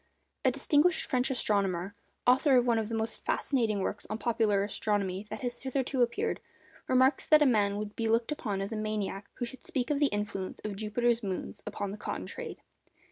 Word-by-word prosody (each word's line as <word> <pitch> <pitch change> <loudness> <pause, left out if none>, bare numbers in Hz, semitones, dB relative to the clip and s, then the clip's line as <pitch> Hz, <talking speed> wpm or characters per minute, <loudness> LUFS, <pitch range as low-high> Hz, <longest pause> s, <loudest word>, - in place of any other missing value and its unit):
_ - - -41 0.4
A 260 - +5
distinguished 295 +5 +3
French 255 +1 +1
astronomer, 200 -7 0 0.3
author 260 +2 +5
of 245 - +4
one 235 -2 +3
of 220 -1 -3
the 230 - -2
most 220 0 -2
fascinating 225 -7 +1
works 205 - -3
on 215 - -2
popular 220 -4 +2
astronomy 200 -1 -1
that 215 +1 -6
has 245 -1 -4
hitherto 265 0 -1
appeared, 410 - +1 0.5
remarks 260 +2 +3
that 305 -1 +7
a - - +4
man 205 -5 +3
would 210 0 -5
be 230 - -1
looked 230 +4 +2
upon 210 -9 -2
as 195 +3 -3
a - - -2
maniac 210 -2 -3
who 245 - -2
should 260 +2 -9
speak 275 -7 -2
of 285 - +1
the 290 - +5
influence 205 -4 -3
of 210 -2 -4
Jupiter's 230 +3 +1
moons 200 0 -4
upon 205 -1 -3
the 205 - -6
cotton - - -4
trade. - - -7
225 Hz, 200 wpm, -30 LUFS, 205-255 Hz, 0.5 s, that